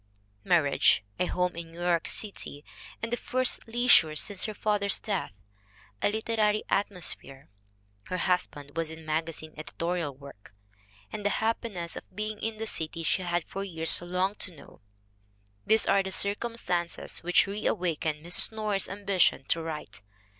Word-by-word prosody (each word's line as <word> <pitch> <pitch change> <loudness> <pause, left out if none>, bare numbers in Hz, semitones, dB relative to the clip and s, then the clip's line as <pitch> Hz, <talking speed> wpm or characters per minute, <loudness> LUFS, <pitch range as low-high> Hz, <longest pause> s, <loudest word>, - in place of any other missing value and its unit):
Marriage, 155 -10 +4 0.2
a 180 - +2
home 180 -1 0
in 165 -1 -7
New 170 - -11
York 175 -2 +2
City, 175 -8 -1 0.4
and 225 - -2
the - - +3
first 255 -1 0
leisure 225 -10 +5
since 195 +5 0
her 215 - -3
father's 205 -1 +1
death; 200 -4 -2 0.7
a - - +3
literary 215 -1 +1
atmosphere 180 -8 -1 0.6
(her 185 - -3
husband 155 -6 -1
was 165 -1 -1
in 160 0 -9
magazine 155 0 -2
editorial 165 0 -2
work), 130 -8 -14 0.6
and 210 - -4
the 205 - +3
happiness 220 -6 -2
of - - -10
being 215 +1 -3
in 225 0 -3
the 225 - -3
city 165 -5 -3
she 165 - +2
had 175 -1 0
for 195 - -5
years 165 -4 +2
longed 180 +3 -1
to 180 - -3
know 140 - -15 0.9
these 220 0 +5
are 195 0 +4
the 190 0 -4
circumstances 200 -4 -1
which 175 +1 +4
reawakened 170 -6 -1
Mrs. 175 +5 +4
Norris's 215 -3 0
ambition 200 -2 +2
to 165 - +3
write. 150 -12 -6
180 Hz, 150 wpm, -29 LUFS, 165-210 Hz, 0.9 s, leisure